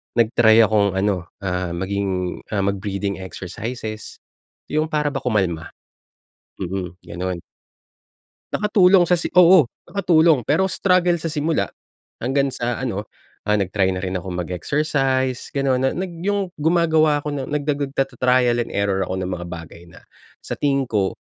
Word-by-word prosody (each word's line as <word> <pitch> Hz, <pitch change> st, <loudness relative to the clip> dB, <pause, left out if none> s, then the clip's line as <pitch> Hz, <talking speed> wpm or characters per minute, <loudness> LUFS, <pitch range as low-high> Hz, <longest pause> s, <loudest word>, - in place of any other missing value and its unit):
nag-try 115 Hz, -1 st, +5 dB
akong 100 Hz, -3 st, +2 dB
ano, 95 Hz, -3 st, 0 dB, 0.2 s
ah, 90 Hz, -2 st, -2 dB
maging 95 Hz, -1 st, -2 dB
mag-breathing 100 Hz, -1 st, -2 dB
exercises, 110 Hz, +4 st, -7 dB, 0.5 s
yung 155 Hz, +1 st, +1 dB
para 150 Hz, -2 st, 0 dB
ba 135 Hz, -, -3 dB
kumalma? 95 Hz, -8 st, 0 dB, 0.9 s
Mm, 90 Hz, -1 st, -4 dB
ganun. 90 Hz, 0 st, -5 dB, 1.1 s
Nakatulong 190 Hz, -4 st, +4 dB
sa 180 Hz, -, +4 dB
si 170 Hz, -, -4 dB
oo, 180 Hz, -2 st, +7 dB, 0.2 s
nakatulong 165 Hz, -, +3 dB
pero 180 Hz, -, +2 dB
struggle 180 Hz, -1 st, +2 dB
sa 165 Hz, -1 st, -4 dB
simula 155 Hz, +1 st, 0 dB, 0.5 s
hanggang 135 Hz, +2 st, 0 dB
sa 120 Hz, +1 st, -3 dB
ano, 105 Hz, -5 st, -3 dB, 0.4 s
ah, 105 Hz, -, +3 dB
nag-try 95 Hz, -1 st, +1 dB
na 90 Hz, -, -4 dB
rin 95 Hz, 0 st, -2 dB
akong 90 Hz, 0 st, -6 dB
mag-exercise, 130 Hz, -, -1 dB
ganun, 135 Hz, -2 st, +1 dB
na 135 Hz, 0 st, 0 dB
nag 185 Hz, -1 st, -3 dB
yung 195 Hz, 0 st, -1 dB
gumagawa 160 Hz, -2 st, +3 dB
ako 150 Hz, -, -3 dB
ng 140 Hz, -2 st, -4 dB
nagdagud 145 Hz, -1 st, -2 dB
tata-trial 125 Hz, -2 st, +2 dB
and 120 Hz, -, -3 dB
error 100 Hz, -1 st, 0 dB
ako 95 Hz, -, -3 dB
ng 90 Hz, -, -3 dB
mga 85 Hz, -1 st, -4 dB
bagay 85 Hz, -1 st, -9 dB
na 85 Hz, -, -16 dB, 0.4 s
sa -, -, -5 dB
tingin 140 Hz, -2 st, +2 dB
ko 105 Hz, -6 st, -1 dB
120 Hz, 140 wpm, -21 LUFS, 95-150 Hz, 1.1 s, oo